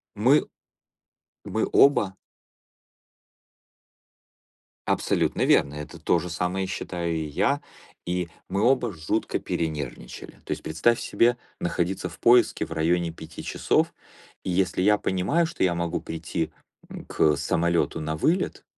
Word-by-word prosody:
Мы - - +4 1.0
мы - - -1
оба. 105 -9 +5 2.7
Абсолютно - - +1
верно, 70 - +3
это 75 +3 -8
то 80 +2 +2
же 90 +2 -5
самое 90 +3 -1
считаю 85 -2 -3
и 80 -1 -2
я, 100 - 0 0.4
и 90 -1 -2 0.2
мы 95 +2 0
оба 125 -1 +3
жутко 85 +6 -2
перенервничали. 75 -7 -4
То - - -12
есть - - -2
представь 110 +10 +1
себе 120 +1 +2 0.2
находиться 90 +1 -2
в - - -13
поиске 120 0 +4
в 80 - -10
районе 85 +1 +1
5 80 0 -10
часов, - - 0 0.5
и - - -3
если 90 0 +1
я 105 +2 +4
понимаю, 95 - +1
что 160 - -5
я 90 -2 +2
могу 85 -1 -2
прийти, 80 0 -4 0.4
м, - - -9
к 75 -1 +3
самолёту 85 0 0
на 80 0 -2
вылет, 165 - 0
90 Hz, 130 wpm, -25 LUFS, 80-100 Hz, 2.7 s, оба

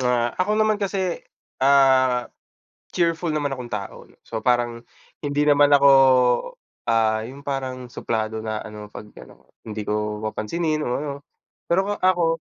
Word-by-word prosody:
Ah, 120 -1 +1
ako 210 +3 +1
naman 215 -1 +2
kasi, 190 -3 -2 0.4
ah, 130 -2 +4 0.6
cheerful 170 0 0
naman 150 -3 -1
akong 125 -3 -6
tao 100 -3 -7
'no. - - -24
So, 110 - -5
parang 120 0 0 0.4
hindi 145 0 0
naman 145 -1 +5
ako, 140 0 +6 1.0
ah, 110 -1 +2
yung 140 +2 -12
parang 130 -3 -4
suplado 110 -2 -3
na 110 -1 -4
ano, 105 -1 -9
'pag 105 0 -11
ano - - -17
hindi 105 -1 -6
ko 105 0 -3
papansinin 155 +9 -2
o 150 - -2
ano. 145 0 -4 0.6
Pero 185 +3 +2
o 205 - -2
ako, 170 -3 +2
130 Hz, 150 wpm, -23 LUFS, 110-155 Hz, 1.0 s, ako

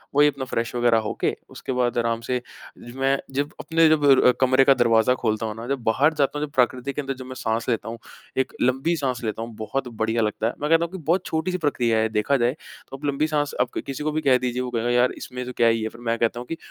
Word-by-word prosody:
वही 145 0 +6
अपना 135 -2 -2
फ़्रेश 115 -2 -2
वगेरह 120 -1 +3
होके, - - -1
उसके - - -6
बाद 125 -1 0
आराम 115 -1 0
से 125 -1 0 0.4
ज 120 - -11
मैं 135 +1 +3 0.2
जब 145 +2 -1
अपने 165 0 +3
जब 155 -2 +3
र 130 -2 +6
कमरे 130 +1 +5
का 135 - +7
दरवाज़ा 115 -1 +3
खोलता 110 -2 -1
हूँ 110 0 -4
ना, 115 +1 -7
जब 135 -2 -2
बाहर 135 +8 +3
जाता 145 0 0
हूँ, 150 - -1
जब 145 - -14
प्रकृति 130 +2 +1
के 145 - -2
अंदर, 135 0 -3
जब 130 -1 -10
मैं 130 0 -8
साँस 115 -1 -2
लेता 115 -2 -1
हूँ, 115 - -6 0.4
1 130 0 0
लंबी 135 +7 +1
साँस 130 -4 -2
लेता 110 0 -3
हूँ, 115 0 -6
बहुत 125 +4 -3
बढ़िया 115 0 -1
लगता 110 +1 0
है। 120 - -2
मैं 150 - -1
कहता 165 +1 +4
हूँ 170 - -9
कि 190 - -6
बहुत 175 +3 +1
छोटी-सी 175 +3 -1
प्रक्रिया 125 -8 +1
है, 110 0 +1
देखा 110 +6 +1
जाए 120 0 +2 0.4
तो। 135 - -6
आप 145 - -8
लंबी 145 +2 +1
साँस, 145 -1 -1
आप 125 - +1
क - - -1
किसी 135 +1 -5
को 155 - 0
भी 155 +1 -1
कह 135 -3 +4
दीजिए, 125 0 -2
वो 125 - -3
कहेगा, 120 0 -1
"यार, 125 +1 +3
इसमें 125 -1 -6
तो 125 - -5
क्या 115 - +4
ही 115 -1 +2
है?" 110 - -2
फिर 115 +2 -15
मैं 115 0 -1
कहता 120 +1 0
हूँ 125 - -7
कि, 165 - -4
125 Hz, 275 wpm, -24 LUFS, 115-140 Hz, 0.4 s, का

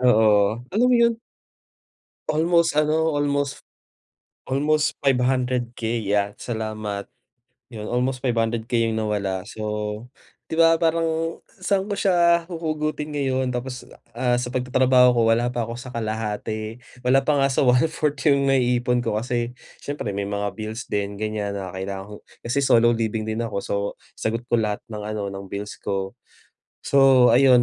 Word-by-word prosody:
Oo, 110 -3 +5 0.4
alam 230 +5 +3
mo - - +5
yon? 235 -1 +4 1.1
Almost 165 +1 +3
ano, 160 +1 +1
almost 140 -1 -1 0.9
almost 150 +3 +1
500k 125 -3 0
'yan, 100 0 0
salamat 110 -3 -4 0.6
yon 105 -1 -6
almost 125 +1 -1
500k 115 -1 0
yung 110 -1 -1
nawala 100 -2 -2
so, 110 -1 -7 0.8
di 160 - -2
ba 165 0 +6
parang 165 0 0
saan 195 +2 -1
ko 205 - -2
siya 170 -3 +3
huhugutin 155 -3 -3
ngayon 130 -2 0
tapos, 125 0 -5 0.2
ah, 125 -1 +1
sa 125 0 -3
pagtatrabaho 125 0 +4
ko - - +3
wala 120 +2 +2
pa 120 -1 -2
ako 115 - -6
sa 130 - -9
kalahati, 110 -1 -3 0.2
wala 130 +2 +3
pa 145 -1 +2
nga 135 - +3
sa 135 0 +1
one 125 0 +5
fourth 160 - -7
1/4 145 -2 +1
yung 140 -1 +3
naiipon 125 -1 +2
ko 105 - -1
kasi 120 +1 -2 0.2
siyempre 140 -7 -4
may 100 0 -3
mga 100 0 -2
bills 110 +2 -6
din 100 0 -3
ganyan 105 -1 -3
na 95 -2 -5
kailangan 95 +2 -6
ko. 105 - -7 0.3
Kasi 130 +4 0
solo 120 -3 +4
living 110 -1 -1
din 110 +1 -3
ako 115 -3 -3
so, - - -2 0.4
sagot 115 +2 -3
ko 120 -1 +1
lahat 105 -1 -2
ng 105 - -5
ano 105 0 -4
ng 100 0 -8
bills 100 +2 -6
ko. 95 -1 -3 0.7
So, 135 -3 +5
ayun 125 0 +6
125 Hz, 155 wpm, -23 LUFS, 110-140 Hz, 1.1 s, ba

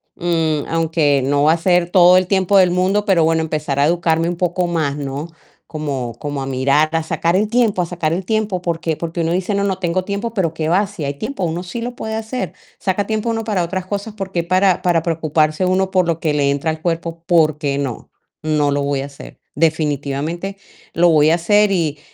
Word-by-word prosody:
mm, 160 -4 0
aunque 160 -4 +1
no 145 +1 +1
va 155 +2 +5
a - - 0
ser 175 0 +2
todo 180 0 +6
el 185 - +1
tiempo 195 0 +2
del 185 -2 +5
mundo, 190 +3 +1
pero 185 -6 +3
bueno, 160 0 +2
empezar 150 -3 -2
a 140 - +4
educarme 165 0 +1
un 175 - -2
poco 180 +1 0
más, 155 -5 -1
¿no? 140 +3 -5 0.4
Como 140 -6 -4
como 145 -1 -4
a - - -3
mirar, 140 +4 +2
a 165 -1 +1
sacar 170 +3 0
el 210 - +1
tiempo 230 -6 +2
a - - 0
sacar 170 -2 -2
el 180 +2 -3
tiempo, 215 -3 -1
¿por 170 -2 -2
qué?, 160 -2 -1
porque 170 0 -3
uno 165 +1 0
dice: 185 +3 -1
"No, 200 - 0
no 195 -2 0
tengo 185 0 -1
tiempo", 200 +4 -4
pero 170 -6 0
qué 160 -1 -3
va, 190 +5 +3
si 190 -8 -6
hay 140 - -2
tiempo, 205 - -5
uno 170 +2 -3
sí 210 +6 -6
lo 245 +1 -5
puede 220 -1 -4
hacer, 220 - -4 0.3
saca 195 +1 -1
tiempo 220 +1 -1
uno 225 -1 -1
para 205 -5 0
otras 185 +2 -3
cosas, 205 +3 -4
por 195 -2 -5
qué 170 -1 0
para 185 +1 +2
para 175 -2 +2
preocuparse 155 0 0
uno 185 +1 +1
por 185 -2 +2
lo 165 -1 0
que 155 -3 0
le 140 -1 +2
entra 145 +3 -1
al 155 0 -7
cuerpo, 165 -1 -3
¿por 160 -4 +3
qué 140 -2 -2
no?, 135 -4 -4 0.3
no 150 -2 +1
lo 140 0 0
voy 140 -1 -1
a 135 - -4
hacer, 140 -1 -12 0.2
definitivamente 155 +3 -1 0.4
lo 175 +1 +4
voy 155 -1 +5
a 165 - +4
hacer 205 +4 +3
y 155 -5 0
170 Hz, 230 wpm, -18 LUFS, 155-185 Hz, 0.4 s, todo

